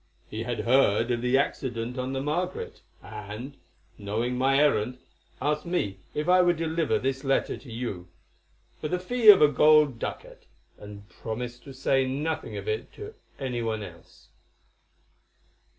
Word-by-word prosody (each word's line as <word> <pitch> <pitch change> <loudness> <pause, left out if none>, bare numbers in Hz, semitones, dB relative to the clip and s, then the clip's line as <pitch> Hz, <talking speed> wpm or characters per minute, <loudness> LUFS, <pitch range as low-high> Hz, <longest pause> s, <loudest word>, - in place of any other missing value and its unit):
He 110 - -4
had 120 0 -3
heard 120 -2 +3
of 120 -1 0
the 125 +2 +2
accident 125 -3 -2
on 130 +1 -2
the 135 - -2
Margaret, 175 +5 -3 0.2
and, 110 +6 -8 0.4
knowing 110 +5 -2
my 135 +2 +2
errand, 125 -4 +2 0.4
asked 150 +4 -1
me 100 - -1 0.2
if 150 +2 -2
I 180 0 +6
would 175 -2 +3
deliver 165 -1 0
this 135 +1 -2
letter 135 -1 +1
to 130 - -13
you, 110 -7 -5 0.7
for - - -3
the 180 - -1
fee 220 +5 +3
of 195 -6 +10
a - - +8
gold 150 -3 +4
ducat, - - -7 0.3
and 105 0 -11
promise 120 +2 -6
to 135 - -12
say 135 0 +1
nothing 150 +5 -3
of - - -7
it 440 0 -3
to 425 +1 -9 0.2
any 125 -3 -3
one 110 -2 -2
else." 85 -4 -14
130 Hz, 155 wpm, -27 LUFS, 115-150 Hz, 0.7 s, of